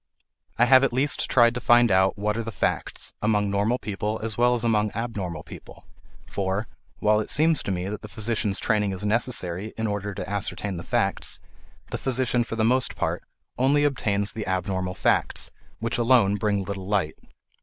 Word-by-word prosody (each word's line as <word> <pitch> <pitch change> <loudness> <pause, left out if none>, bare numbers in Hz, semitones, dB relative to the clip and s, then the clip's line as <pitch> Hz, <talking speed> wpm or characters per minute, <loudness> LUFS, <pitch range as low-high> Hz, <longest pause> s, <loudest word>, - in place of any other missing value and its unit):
I 120 - +5
have 130 +1 +6
at 135 - +2
least 135 +4 0
tried 120 -2 +5
to 125 - -4
find 120 -1 +5
out 95 +2 +3
what 105 +1 -1
are 115 - -1
the 115 0 -5
facts, - - -2
among 105 -2 +1
normal 105 +5 +1
people 105 0 -3
as 110 -2 -3
well 125 +1 +3
as 120 - -2
among 105 -2 +2
abnormal 100 -9 -4
people; - - -13 0.4
for, 100 +2 -2 0.3
while 105 0 +3
it 110 - -3
seems 155 0 +3
to - - -3
me 90 0 -2
that 105 +1 -5
the - - -8
physician's 110 -2 -1
training 105 -3 +1
is 95 +2 -5
necessary 105 -3 0
in 110 - -1
order 105 -1 -3
to - - -5
ascertain 100 -1 -2
the - - -5
facts, - - -1 0.5
the - - -3
physician 125 -2 +1
for 115 - -6
the 110 - 0
most 125 +2 +2
part - - -2 0.4
only 140 +3 +3
obtains 105 -8 0
the 110 -2 -5
abnormal 95 -1 -2
facts, - - 0 0.3
which 115 +1 -2
alone 115 -4 +4
bring 100 -1 0
little 95 -1 -6
light. 95 -7 0
105 Hz, 185 wpm, -25 LUFS, 100-120 Hz, 0.5 s, have